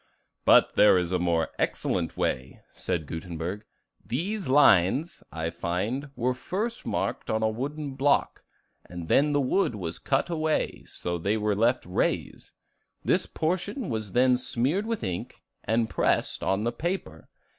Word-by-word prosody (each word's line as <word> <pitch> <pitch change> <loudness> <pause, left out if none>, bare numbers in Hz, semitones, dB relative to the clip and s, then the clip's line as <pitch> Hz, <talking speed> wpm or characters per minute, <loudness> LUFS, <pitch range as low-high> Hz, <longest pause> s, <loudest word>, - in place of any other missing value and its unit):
"But - - +6
there 105 -2 +7
is 90 -1 -1
a 90 - +1
more 85 -2 +1
excellent - - 0
way," 65 +1 -2
said 80 -3 -2
Gutenberg. 85 +5 -5 0.4
"These 190 - -2
lines, 135 - +4
I 80 0 -3
find, 100 - -2
were 125 +2 0
first 210 - -4
marked - - -2
on 110 0 0
a 110 - +3
wooden 140 +5 -4
block, 140 +1 +1 0.4
and 85 -2 -8
then 145 +2 +4
the 145 - +2
wood 135 - +1
was 85 -4 -5
cut 140 +5 0
away, 155 -1 -1
so 85 0 -4
that - - -12
they 105 +2 +1
were 105 -1 0
left 120 +4 +2
raised; 90 - -2 0.6
this - - +2
portion 185 - -2
was 110 -4 -3
then 125 0 +4
smeared 130 - 0
with 230 -2 -2
ink 90 -3 -4 0.3
and 115 +2 +1
pressed - - 0
on 95 +2 0
the 120 - 0
paper. 160 - -4
115 Hz, 155 wpm, -27 LUFS, 90-150 Hz, 0.6 s, there